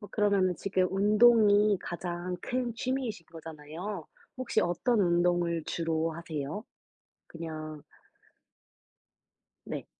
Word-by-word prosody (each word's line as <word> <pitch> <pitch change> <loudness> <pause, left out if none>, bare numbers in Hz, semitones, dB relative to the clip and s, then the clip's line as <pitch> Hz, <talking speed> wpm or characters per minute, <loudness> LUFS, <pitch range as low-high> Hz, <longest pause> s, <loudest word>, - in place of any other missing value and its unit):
어 205 - -9
그러면은 200 -4 +2
지금 190 -2 +1
운동이 210 0 +5
가장 175 +1 -4
큰 245 0 -2
취미이신 245 -8 -3
거잖아요. 160 +3 -7 0.3
혹시 255 -1 0
어떤 215 +7 +1
운동을 175 -2 +2
주로 165 -1 -1
하세요? 160 +3 -5 0.6
그냥 155 -2 -7 1.8
네. - - -5
180 Hz, 215 characters per minute, -30 LUFS, 165-210 Hz, 1.8 s, 운동이